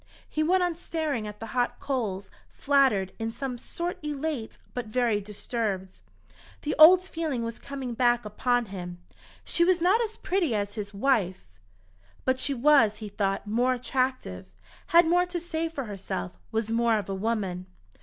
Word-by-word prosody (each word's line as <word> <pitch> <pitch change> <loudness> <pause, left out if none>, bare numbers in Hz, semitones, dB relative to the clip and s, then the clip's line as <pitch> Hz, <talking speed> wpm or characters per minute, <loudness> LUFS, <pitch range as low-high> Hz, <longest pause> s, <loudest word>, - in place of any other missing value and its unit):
He 310 - -2
went 360 +4 +3
on 350 -1 +1
staring 315 -9 -3
at 210 0 -8
the 225 - -5
hot 245 -1 0
coals, 215 -8 -3 0.2
flattered, 265 -10 +2
in 225 0 -1
some 245 +1 -5
sort 345 +7 -4
elate, 295 -5 -3 0.2
but 245 -3 -4
very 225 -2 +1
disturbed. 205 -2 -4 0.6
The 300 - -1
old 360 +4 +9
feeling 320 -9 -3
was 230 0 -5
coming 270 -3 -5
back 240 -1 +2
upon 245 +3 +1
him. 175 -2 -6 0.5
She 340 - +2
was 365 0 +3
not 375 +7 +4
as 445 -1 -3
pretty 350 - 0
as 205 -1 -2
his 205 -1 -5
wife, 200 - +1 0.8
but 260 0 +2
she 280 +1 +1
was, 240 -5 +5
he 215 -1 -7
thought, 195 0 -1
more 240 +5 +2
attractive, 255 - -2 0.4
had 340 0 +6
more 355 +2 +3
to 355 0 -3
say 330 -1 -2
for 290 -4 -4
herself, 195 - -5 0.2
was 225 0 -1
more 230 -1 +3
of 210 - -4
a 195 - -3
woman. 190 -3 -2
245 Hz, 165 wpm, -27 LUFS, 210-305 Hz, 0.8 s, old